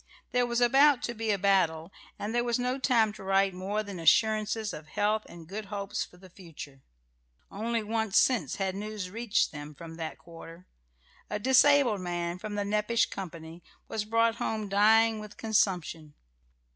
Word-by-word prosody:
There 250 -1 +2
was 235 0 -1
about 270 +2 +5
to 240 - -2
be 225 -1 -4
a 205 - +2
battle, 180 -4 +1 0.3
and 210 +2 -4
there 240 0 +1
was 240 -1 0
no 250 +2 -1
time 230 -5 +2
to 215 -2 -11
write 195 0 +2
more 195 +4 -3
than 200 -4 -8
assurances 215 +4 +2
of 150 0 -9
health 210 +6 0
and 170 -2 -12
good 205 +4 -6
hopes 200 0 -4
for 180 - -15
the 185 +1 -15
future. 160 -7 -12 0.7
Only 225 +2 -2
once 220 -1 0
since 215 - +2
had 190 -1 -2
news 205 -2 -5
reached 225 -1 0
them 150 0 -9
from 165 +1 -10
that 160 -1 -5
quarter. 165 +1 -13 0.6
A 210 - -2
disabled 260 -2 +4
man 175 0 -3
from 210 +1 -6
the 205 -1 -1
Nepash 210 +3 +1
company 165 -3 -8 0.3
was 220 - -3
brought 230 +1 +1
home 215 -2 -2
dying 220 +2 +4
with 210 -1 -10
consumption. 180 -8 -1
205 Hz, 170 wpm, -29 LUFS, 180-225 Hz, 0.7 s, about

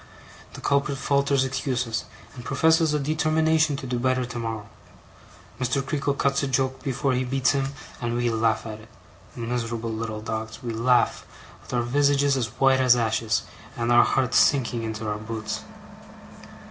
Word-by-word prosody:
The - - -9
culprit 140 0 +1
falters 140 0 +2
excuses, 125 -4 -2 0.3
and 125 - -10
professes 160 +3 +3
a 150 - +1
determination 155 +1 +2
to 135 - -7
do 125 -1 -2
better 130 0 +1
tomorrow. 115 -3 -5 0.9
Mr. 130 +2 0
Creakle 140 0 -1
cuts 140 0 +1
a 140 - -1
joke 130 0 0
before 135 -1 -1
he 125 +1 0
beats 130 0 +1
him, 135 -1 0 0.3
and 120 -1 -1
we 120 -1 +1
laugh 115 0 +1
at 110 -1 -6
it, 110 +1 -16 0.5
miserable 115 -1 -3
little 110 -1 -4
dogs, 110 +1 -5
we 120 -2 -3
laugh, 120 +2 +2 0.4
with - - -13
our 120 -1 +1
visages 140 +2 +2
as 125 -4 0
white 135 -1 +4
as 125 -1 +6
ashes, 110 -2 0 0.3
and 120 0 0
our 120 - +7
hearts 130 -2 +1
sinking 125 -4 +2
into 110 -1 -4
our 105 0 -2
boots. 110 0 -5
125 Hz, 160 wpm, -25 LUFS, 115-140 Hz, 0.9 s, our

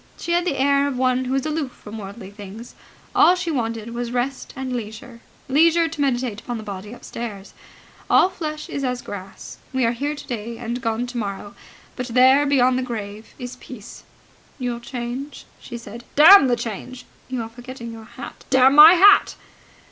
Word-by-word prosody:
She 340 - -5
had 345 +1 +2
the 300 -6 -1
air 280 +1 +3
of 275 -3 -3
one 255 0 +1
who 260 +1 -1
is 270 - -1
aloof 305 -4 -3
from 215 +1 -10
worldly 200 0 -9
things. 205 +3 -10 0.4
All 360 - +6
she 355 -2 -3
wanted 230 -4 -3
was 240 0 -4
rest 250 +2 -3
and 260 -1 -4
leisure 230 +1 -7 0.3
leisure 330 +4 +4
to 320 -2 -6
meditate 245 -5 -1
upon 240 -1 -5
the 220 - -7
body 205 0 -7
upstairs. 225 -4 -8 0.6
All - - +5
flesh 310 -5 -6
is 280 - -4
as 250 -1 -2
grass. 195 -1 -9
We 260 -2 +1
are 230 - +2
here 285 +5 -3
today 235 -4 -6
and 240 +1 -4
gone 230 0 -1
tomorrow. 205 -5 -5 0.4
But 250 -1 -4
there, 260 +4 +5
beyond 255 -2 +3
the - - -1
grave, 220 -3 -7
is 250 -1 -8
peace. 245 -5 -11 0.6
"Your 245 -3 -3
change?" 245 +3 -6
she 235 - -8
said. 230 +1 -10
"Damn 320 +2 +9
the 245 - +2
change!" 240 +2 -7 0.2
"You 255 -3 -3
are 225 - -8
forgetting 240 0 -9
your 225 -1 -11
hat." 255 - -10
"Damn 265 0 +5
my 305 +4 +10
hat!" 400 +3 +6
245 Hz, 180 wpm, -22 LUFS, 230-275 Hz, 0.6 s, my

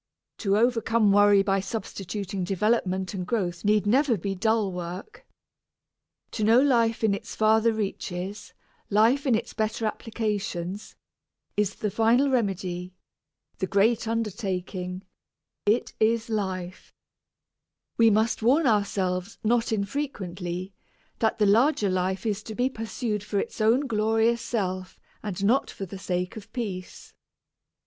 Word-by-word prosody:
To 200 -2 +2
overcome 225 -2 +3
worry 205 0 +6
by 195 0 +1
substituting 195 -1 -4
development 190 -1 0
and 185 -2 -3
growth 180 -4 -2
need 210 0 +3
never 250 +2 +3
be 195 +2 -3
dull 220 +1 +1
work. 180 - -7 1.0
To 215 - -3
know 225 +3 +6
life 235 -5 +2
in 215 -2 +3
its 200 - -6
farther 220 +1 +4
reaches, 195 -2 -4 0.4
life 230 +7 +3
in 245 - +4
its 235 +2 -3
better 220 +1 -1
applications, 210 -3 -3 0.6
is 205 -1 0
the 210 - -2
final 235 +7 +3
remedy 185 -6 -2 0.6
the 190 - -1
great 215 +4 +2
undertaking 190 -4 -3 0.6
it 220 +4 +2
is 225 +1 +1
life. 190 -4 -3 1.0
We 230 -1 +5
must 220 +3 +1
warn 275 +8 +4
ourselves, 200 -3 0
not 230 +1 +2
infrequently, 195 -6 -3 0.5
that 220 - +1
the 215 - +3
larger 220 +1 +3
life 185 +2 -1
is 210 -2 -1
to 220 - -6
be 250 +3 +1
pursued 225 -2 -3
for 205 - -3
its 220 +2 -3
own 235 +6 +3
glorious 225 0 +2
self 185 -5 -3 0.2
and 200 -2 -3
not 250 +6 +3
for 195 - -6
the 195 +1 -9
sake 180 -1 -2
of 215 -2 -10
peace. 195 -7 -6
210 Hz, 130 wpm, -26 LUFS, 190-225 Hz, 1.0 s, worry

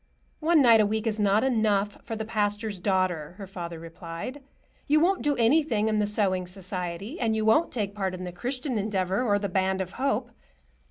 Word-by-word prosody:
"One 315 -2 +4
night 230 -3 +7
a - - +3
week 220 +1 -2
is 220 -1 -1
not 205 +1 +3
enough 215 -5 +1
for 225 - -5
the 220 0 -4
pastor's 210 -1 -1
daughter," 180 -4 0
her 200 - -7
father 175 -3 -7
replied. 165 - -7 0.5
"You 300 +2 +4
won't 370 +4 +2
do 290 -1 +1
anything 235 -3 +2
in 215 -1 +1
the 210 - +1
sewing 190 -3 0
society, 185 - -5
and 225 -3 +1
you 220 0 0
won't 225 +10 +4
take 205 -4 -2
part 190 -3 -2
in 185 - -7
the 180 - -5
Christian 250 - -3
Endeavor 195 -1 0
or 210 -5 +2
the 200 0 -2
Band 190 0 0
of 185 -1 -3
Hope. 245 -1 -1
210 Hz, 200 wpm, -27 LUFS, 190-230 Hz, 0.5 s, night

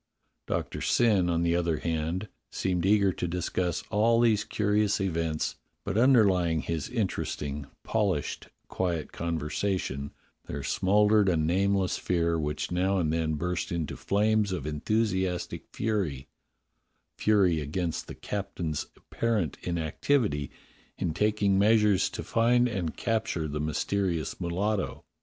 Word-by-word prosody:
Doctor - - -3
Syn, 105 -7 +3
on 85 0 +1
the 85 0 +2
other 85 -2 +1
hand, 85 +5 -2 0.2
seemed 90 -1 0
eager 100 -2 +4
to 90 - -3
discuss 90 0 -1
all 115 +3 +3
these 115 -3 +3
curious 105 0 +1
events, 80 -5 -1 0.3
but 100 - -3
underlying 100 - +4
his 80 -2 -3
interesting, 75 - -3 0.2
polished, 100 -10 -1 0.2
quiet 85 -4 -2
conversation 80 -2 -2 0.4
there 70 -1 -5
smouldered 105 +5 +3
a 85 - +2
nameless 95 +4 +1
fear 85 -2 +1
which 75 +1 -3
now 95 +2 +1
and 80 -4 +1
then 80 -1 0
burst 90 +3 -2
into 85 -4 -2
flames 105 0 +1
of 90 -7 -3
enthusiastic 95 +3 -1
fury 95 -12 -2 0.4
— - - -49
fury 95 -6 +3
against 80 +3 -3
the - - -8
captain's 90 -6 -4
apparent 110 -10 -1
inactivity 85 - 0 0.5
in 85 -3 -1
taking 100 +1 +2
measures 105 -2 +4
to - - -6
find 120 +2 +3
and 95 -9 -3
capture 110 -8 -1
the 75 0 -3
mysterious 85 +1 -1
mulatto. 95 +4 -1
90 Hz, 125 wpm, -28 LUFS, 80-105 Hz, 0.5 s, eager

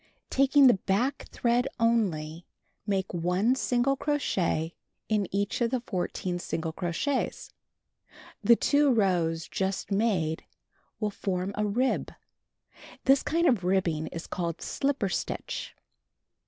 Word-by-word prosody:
Taking 275 +1 +5
the 250 - +8 0.2
back 240 +9 +1
thread 245 +2 +1
only, 175 -9 0 0.4
make 195 -2 -1
1 180 +7 +2
single 260 +1 +1
crochet 185 - 0 0.4
in 210 -3 +1
each 200 +4 -1
of 235 - +3
the 255 +1 0
14 180 -4 -3
single 160 -1 -3
crochets. 180 - -2 0.9
The 235 +3 +7
two 285 +3 +3
rows 175 -7 +1
just 190 +1 -2
made 195 -7 +1 0.6
will 210 -1 -1
form 185 -1 -2
a 210 0 0
rib. 250 +6 0 0.9
This 270 0 +5
kind 335 +2 +1
of 240 - +3
rib 185 0 +2 0.2
is 165 -1 -6
called 170 -2 -4
"slipper 275 -7 0
stitch." 185 - -4
200 Hz, 120 wpm, -28 LUFS, 180-250 Hz, 0.9 s, the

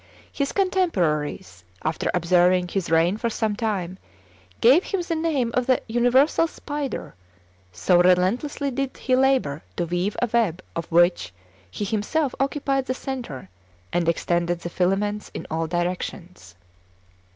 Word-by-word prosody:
His 280 -1 -2
contemporaries, 175 - 0 0.2
after 155 0 -1
observing 180 +1 +3
his 190 -1 -2
reign 165 +4 +3
for 235 +1 -1
some 220 -2 -1
time, 190 -5 -3 0.6
gave 275 +10 +5
him 390 -3 -2
the 340 - -2
name 315 -7 0
of 250 -1 0
the 255 - +4
universal 245 +7 +3
spider, 290 -3 -5 0.6
so 100 - +3
relentlessly 195 +11 +2
did 270 +1 -3
he 255 - +1
labor 260 - +2
to 175 - -1
weave 175 +4 -2
a 245 - +1
web 200 -7 +1
of 165 0 -5
which 175 - +3 0.4
he 205 - -4
himself 235 +7 -1
occupied 275 -1 0
the 255 - -1
centre 240 - -6 0.5
and 170 -1 +2
extended 170 +1 0
the 175 - -5
filaments 205 +4 0
in - - -5
all 160 0 -1
directions. 175 - -4
200 Hz, 140 wpm, -24 LUFS, 175-265 Hz, 0.6 s, gave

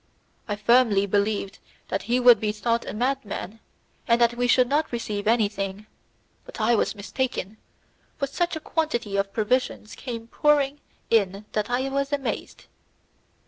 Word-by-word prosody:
I 205 - -1
firmly 210 -2 +4
believed 200 0 -1 0.3
that - - -1
he 245 +1 +3
would 245 -3 +7
be 210 0 0
thought 230 +2 -1
a - - -4
madman, 225 -4 -3 0.5
and 235 -1 +4
that 235 0 +4
we 245 +1 0
should 250 0 +4
not 295 +4 0
receive 215 -4 -3
anything, 205 -3 0 0.6
but - - -11
I 220 +2 +3
was 220 - 0
mistaken, 215 -1 -3 0.6
for 280 - 0
such 345 +5 -1
a - - -3
quantity 300 -11 -2
of 195 0 0
provisions 220 0 -1
came 230 -3 -6
pouring 290 +2 +2 0.3
in 200 -2 +2
that 210 +1 -1
I 255 +2 0
was 275 +1 -1
amazed. 280 -2 -3
235 Hz, 150 wpm, -25 LUFS, 205-260 Hz, 0.6 s, would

